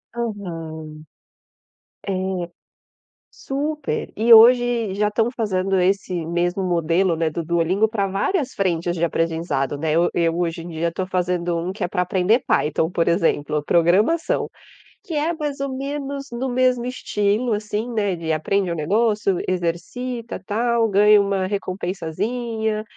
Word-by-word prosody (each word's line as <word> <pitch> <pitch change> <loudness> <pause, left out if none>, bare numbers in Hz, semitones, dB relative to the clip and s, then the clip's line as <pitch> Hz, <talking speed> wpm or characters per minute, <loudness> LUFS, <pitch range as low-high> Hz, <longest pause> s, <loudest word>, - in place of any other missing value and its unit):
Aham. 165 -9 -5 1.1
É. 195 - -1 1.2
Super. 295 +1 -3
E 230 +2 +6
hoje 235 -2 +5
já 210 +1 +1
estão 225 +3 0
fazendo 190 -4 0
esse 195 0 +1
mesmo 175 +3 0
modelo, 170 0 +1
né, 160 -1 0
do 170 +2 -3
duolingo 170 +6 +1
para 205 -3 -1
várias 265 - -1
frentes 175 -3 -1
de 170 - -4
aprendizado, 160 -4 -1
né, 155 0 -1
eu 170 +2 +3
eu 165 -1 +1
hoje 165 -1 -1
em 170 - -8
dia 165 +1 -2
estou 185 +2 -3
fazendo 180 -2 -1
um 175 +3 -3
que 200 - -8
é - - 0
para 180 - 0
aprender 190 +6 +2
Python, 160 +2 +1
por 170 -1 +1
exemplo, 150 -4 +1
programação 190 - +2 0.6
que 355 - -8
é 310 +3 0
mais 295 -3 -4
ou 270 -1 -3
menos 280 0 -4
no 255 +2 -2
mesmo 250 -1 +1
estilo 220 -1 0
assim, 210 +3 -2
né, 205 -5 0
de 160 -1 -2
aprende 180 +4 0
um - - -1
negócio, 205 +4 +1
exercita 225 +8 -3
tal, 230 +1 +1
ganha 205 +1 +6
uma 195 -2 0
recompensazinha, 215 +4 -3
195 Hz, 145 wpm, -22 LUFS, 170-235 Hz, 1.2 s, E